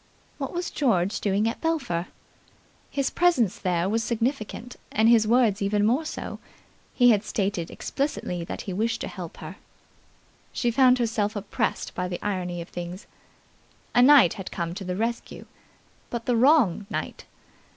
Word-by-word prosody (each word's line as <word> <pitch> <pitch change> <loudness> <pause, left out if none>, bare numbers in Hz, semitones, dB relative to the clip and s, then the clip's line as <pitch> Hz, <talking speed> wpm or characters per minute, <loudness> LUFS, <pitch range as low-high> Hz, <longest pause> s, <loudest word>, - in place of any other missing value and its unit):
What 275 - -3
was 350 0 -3
George 200 -9 +1
doing 205 +2 +1
at 230 - -3
Belpher? 245 - -1 0.8
His 275 -1 -1
presence 280 - +2
there 180 -1 0
was 225 +3 0
significant, 235 0 -3 0.2
and 220 +1 +3
his 230 -2 +5
words 225 -4 +3
even 205 +1 +1
more 255 +9 +2
so. - - -6 0.6
He 245 -1 +6
had 210 -2 +2
stated 195 -5 -2
explicitly 225 - -3
that - - -5
he 190 - -5
wished 225 +4 -1
to - - -3
help 175 -4 -8
her. - - -9 0.9
She 240 - 0
found 255 +1 +5
herself 220 -3 -1
oppressed 205 0 -2
by 180 - -2
the 180 -1 -4
irony 180 -4 -2
of - - -18
things. 175 +3 -7 0.9
A 245 - +5
knight 265 - +7
had 195 -3 -7
come 170 -1 -4
to 195 +2 -6
the 180 -1 -3
rescue 230 +4 -3 0.6
but 235 -1 -4
the 245 - +2
wrong 230 - +4
knight. - - -5
220 Hz, 160 wpm, -25 LUFS, 185-245 Hz, 0.9 s, knight